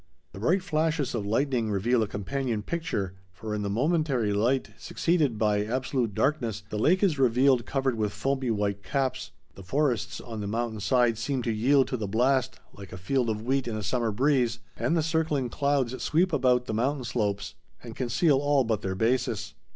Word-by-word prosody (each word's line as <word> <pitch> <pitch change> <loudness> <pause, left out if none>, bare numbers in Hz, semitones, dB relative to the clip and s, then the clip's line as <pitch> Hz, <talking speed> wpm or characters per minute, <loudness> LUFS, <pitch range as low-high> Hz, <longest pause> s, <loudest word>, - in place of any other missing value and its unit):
The - - -10
bright 180 - +1
flashes 155 -4 0
of 105 -4 -3
lightning 120 0 0
reveal 115 +4 +1
a 110 - 0
companion 115 +2 -3
picture, 105 - -3 0.2
for 105 +4 -6
in 105 - -2
the 100 - -2
momentary 130 - +1
light 120 +6 +1
succeeded 155 -9 0
by 105 -1 +2
absolute 125 -1 -1
darkness 115 -8 0
the 105 - -2
lake 185 - +3
is 165 -8 +2
revealed 130 -1 +3
covered 135 -1 0
with 105 -2 -1
foamy 130 +5 -1
white 100 -2 -1
caps. 130 +2 -2 0.2
The - - -12
forests 130 +3 -1
on 115 -3 -7
the 100 - -4
mountain 115 +1 -2
side 120 +1 +2
seem 125 +1 -2
to 115 - 0
yield 130 +4 +3
to 130 - -2
the 105 -3 -3
blast 130 +4 +1
like 100 -1 -11
a 95 - -7
field 120 +6 0
of 110 0 -2
wheat 130 +1 0
in 110 -2 -3
a 105 - -4
summer 120 +2 0
breeze, 125 0 +2 0.2
and 170 - 0
the 160 - +1
circling 155 -5 0
clouds 135 -2 0
sweep 175 +3 +1
about 125 -3 +3
the 110 - -4
mountain 130 +5 0
slopes 105 -4 -2 0.3
and 115 -2 -9
conceal 130 +4 +2
all 145 -1 +2
but 110 -3 -1
their 95 -1 -3
bases. 115 +1 0
125 Hz, 190 wpm, -27 LUFS, 110-140 Hz, 0.3 s, lake